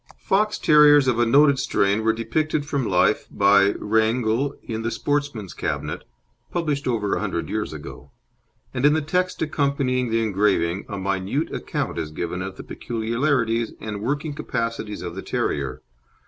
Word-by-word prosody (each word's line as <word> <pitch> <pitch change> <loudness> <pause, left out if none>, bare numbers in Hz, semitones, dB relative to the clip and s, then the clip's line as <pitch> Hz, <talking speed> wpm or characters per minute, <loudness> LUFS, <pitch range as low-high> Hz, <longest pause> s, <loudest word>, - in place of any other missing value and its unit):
Fox 210 +2 +1
terriers 145 -2 +6
of 120 -2 +2
a 120 - +3
noted 140 +2 +5
strain 100 -1 +1
were 110 - +4
depicted 145 +7 -1
from 140 -5 -1
life 90 -1 +2
by 100 0 +4
Reinagle 110 +5 +1
in 110 -1 -4
The 115 - -1
Sportsman's 145 -7 -2
Cabinet, - - -4 0.4
published 150 -5 -2
over 110 -5 0
a - - 0
hundred - - -3
years - - -2
ago; - - -9 0.6
and 125 - -3
in 145 +1 +6
the 155 -1 0
text 180 +4 0
accompanying 140 -4 0
the 115 0 +1
engraving 100 -4 +1
a 100 - -4
minute 100 - -2
account - - -3
is 80 - -3
given 85 +3 -4
of 95 0 -5
the - - -8
peculiarities 115 0 -1
and 105 -1 -5
working 145 +6 -2
capacities 115 -6 -4
of 85 -1 -5
the 95 - -6
terrier. 65 -3 -2
115 Hz, 160 wpm, -23 LUFS, 100-145 Hz, 0.6 s, terriers